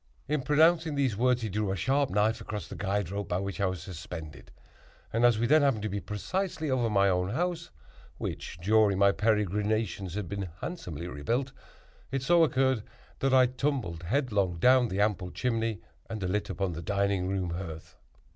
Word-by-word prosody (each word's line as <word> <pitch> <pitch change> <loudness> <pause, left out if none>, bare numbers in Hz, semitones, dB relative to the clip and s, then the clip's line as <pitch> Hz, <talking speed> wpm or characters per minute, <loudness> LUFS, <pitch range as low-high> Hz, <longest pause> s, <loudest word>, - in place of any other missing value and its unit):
In 150 -1 0
pronouncing 160 +3 +3
these 135 -6 +1
words, 125 +2 +2
he 110 - -2
drew 105 0 -1
a - - -1
sharp 135 +7 +1
knife 105 +3 +1
across 105 -2 -5
the - - -8
guide 100 -2 -1
rope 100 0 -3
by 90 - +1
which 100 -1 -4
I 100 - +3
was 95 -1 -4
suspended, 80 -5 -8 0.6
and 115 +2 +1
as 120 -2 +5
we 115 - +1
then 155 +5 +5
happened 135 -7 +2
to 110 - -1
be 100 +1 -2
precisely 155 - -3
over 120 -3 +1
my 100 -2 +3
own 90 -1 +1
house, 175 - -2 0.5
(which, - - -5
during 105 +1 +3
my 100 0 +5
peregrinations, 105 -2 0
had 105 -3 -3
been 100 +1 -4
handsomely 90 - -5
rebuilt,) 115 - -2 0.6
it 135 0 -2
so 170 +3 +5
occurred 130 -5 +2 0.4
that 135 - +1
I 130 -1 +6
tumbled 125 - -2
headlong 100 - 0
down 125 +6 +5
the 95 -1 -3
ample 105 -3 0
chimney 115 -2 -1 0.3
and 110 -1 -4
alit 100 +3 -1
upon 95 -3 -2
the 85 - -5
dining 100 -1 0
room 95 -2 -1
hearth. 85 -3 -7
105 Hz, 185 wpm, -29 LUFS, 95-130 Hz, 0.6 s, I